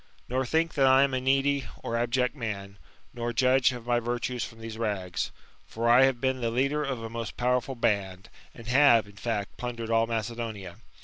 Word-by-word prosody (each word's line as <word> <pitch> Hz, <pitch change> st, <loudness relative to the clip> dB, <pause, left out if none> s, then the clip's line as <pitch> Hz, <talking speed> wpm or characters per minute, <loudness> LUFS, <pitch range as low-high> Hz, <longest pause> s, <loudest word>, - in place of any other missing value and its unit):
Nor 130 Hz, +1 st, -1 dB
think 160 Hz, +4 st, +1 dB
that 135 Hz, -2 st, +3 dB
I 130 Hz, +1 st, +6 dB
am 140 Hz, -1 st, 0 dB
a 130 Hz, -, 0 dB
needy 135 Hz, +1 st, +1 dB, 0.2 s
or 115 Hz, -, -3 dB
abject 120 Hz, +3 st, 0 dB
man, 100 Hz, -6 st, -5 dB, 0.3 s
nor 120 Hz, 0 st, -3 dB
judge 130 Hz, +1 st, +4 dB
of 120 Hz, -2 st, -8 dB
my 120 Hz, 0 st, +2 dB
virtues 120 Hz, +1 st, -2 dB
Irom 115 Hz, -, -12 dB
these 115 Hz, -1 st, -7 dB
rags. 95 Hz, -6 st, -2 dB, 0.4 s
For 115 Hz, +11 st, -2 dB
I 120 Hz, +3 st, +7 dB
have 135 Hz, -2 st, 0 dB
been 130 Hz, 0 st, 0 dB
the 115 Hz, -, 0 dB
leader 140 Hz, +5 st, 0 dB
of 130 Hz, -5 st, -3 dB
a -, -, -4 dB
most 115 Hz, -1 st, -6 dB
powerful 125 Hz, +1 st, 0 dB
band, 95 Hz, -5 st, -1 dB, 0.3 s
and 115 Hz, -, -11 dB
have, 125 Hz, -3 st, +5 dB
in 100 Hz, -, -15 dB
finct, 105 Hz, -2 st, -3 dB
plundered 115 Hz, -2 st, -5 dB
all 115 Hz, 0 st, +3 dB
Macedonia. 110 Hz, -5 st, -4 dB
120 Hz, 195 wpm, -27 LUFS, 115-130 Hz, 0.4 s, I